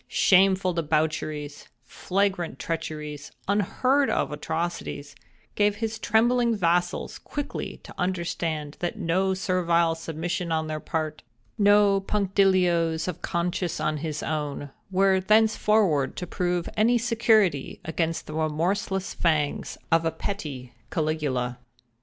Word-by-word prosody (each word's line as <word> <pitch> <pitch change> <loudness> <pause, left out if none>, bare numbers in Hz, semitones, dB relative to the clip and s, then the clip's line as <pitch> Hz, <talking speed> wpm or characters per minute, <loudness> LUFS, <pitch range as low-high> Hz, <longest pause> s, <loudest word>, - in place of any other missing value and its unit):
Shameful 190 -1 +4
debaucheries—flagrant 155 +3 -2
treacheries—unheard 165 - -1
of - - 0
atrocities—gave 170 +5 -3
his 220 0 -3
trembling 235 +2 +3
vassals 175 -2 0
quickly 290 -1 -5
to - - -11
understand 165 -4 -2
that 175 - -3
no 190 +3 +1
servile 170 -3 +2
submission 165 +2 -3
on 160 -1 0
their 155 0 -3
part—no 160 - +1
punctilios 185 -5 +2
of 180 - -4
conscience 175 0 -2
on 155 0 0
his 155 0 -4
own—were 155 +6 0
thenceforward 210 -7 +3
to 180 - -4
prove 175 -1 -1
any 230 +3 +4
security 220 - +2
against 165 0 -2
the 155 - -8
remorseless 175 +5 -1
fangs 155 -4 0
of 165 0 +4
a 165 - +2
petty 145 -13 -5 0.2
Caligula. 145 -6 -1
170 Hz, 100 wpm, -26 LUFS, 155-195 Hz, 0.2 s, Shameful